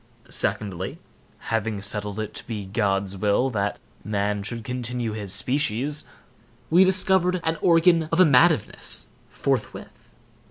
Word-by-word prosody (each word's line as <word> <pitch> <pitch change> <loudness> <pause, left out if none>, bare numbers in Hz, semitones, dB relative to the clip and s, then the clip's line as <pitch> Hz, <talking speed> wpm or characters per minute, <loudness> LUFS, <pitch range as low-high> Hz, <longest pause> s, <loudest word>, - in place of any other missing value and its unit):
Secondly, 95 -3 0 0.5
having 110 -2 -1
settled 105 +1 -4
it 110 - -4
to - - -7
be 105 -4 -5
God's 100 -1 -1
will 105 +7 +1
that 100 -2 -1 0.3
man 105 -1 -1
should 115 +3 -5
continue 125 -1 -3
his 105 -3 -6
species, 140 +4 +1 0.7
we 175 +3 +7
discovered 185 -1 +2
an 160 -1 -1
organ 165 -2 +4
of 165 - +1
amativeness, 160 - +3 0.2
forthwith. 135 -5 -4
115 Hz, 120 wpm, -24 LUFS, 105-155 Hz, 0.7 s, we